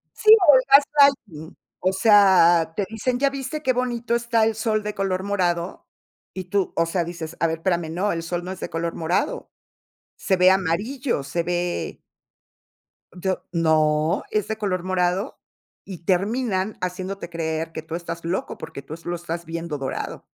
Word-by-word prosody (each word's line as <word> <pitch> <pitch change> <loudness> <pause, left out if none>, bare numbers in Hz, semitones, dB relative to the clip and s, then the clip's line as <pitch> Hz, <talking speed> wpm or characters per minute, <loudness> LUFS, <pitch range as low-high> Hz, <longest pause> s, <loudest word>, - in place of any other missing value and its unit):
Sí, 430 - +1 0.2
o, 290 - +9
el 260 - +3
gaslighting, 275 - +3 0.2
o 185 +1 +1
sea, 190 -5 +5
te 200 - -1
dicen: 245 +3 -2
"¿Ya 280 +1 +3
viste 275 +2 -5
qué 255 -1 +2
bonito 240 -2 -1
está 235 -1 +1
el 225 - 0
sol 215 -1 -1
de 210 - -3
color 190 -1 -1
morado?". 180 -3 -2 0.5
Y 185 -1 -6
tú, 195 +1 -1
o 165 - +2
sea, 170 +1 -1
dices: 170 -1 -7
"A 165 - +2
ver, 160 - -2
espérame, 170 -1 -1
no, 195 +4 0
el 165 -1 -3
sol 175 +1 -3
no 180 - -6
es 190 - -7
de - - -5
color 165 0 -3
morado. 165 +2 -2 0.6
Se 190 -2 0
ve 185 +1 +6
amarillo, 195 - -1
se 165 +5 -2
ve" 175 0 -2 1.1
D 185 +1 -2 0.2
"No, 155 -1 +2
es 215 -2 0
de 220 - -3
color 185 -4 -2
morado". 185 +4 -1 0.5
Y 190 -4 -8
terminan 195 +3 -1
haciéndote 185 +1 -4
creer 165 -1 -3
que 160 - -6
tú 160 +1 -6
estás 170 -1 -6
loco, 175 +3 -3
porque 140 - -8
tú 150 +3 -8
lo 175 - -2
estás 170 0 -5
viendo 165 -2 -4
dorado. 135 -1 -5
185 Hz, 175 wpm, -23 LUFS, 165-215 Hz, 1.1 s, o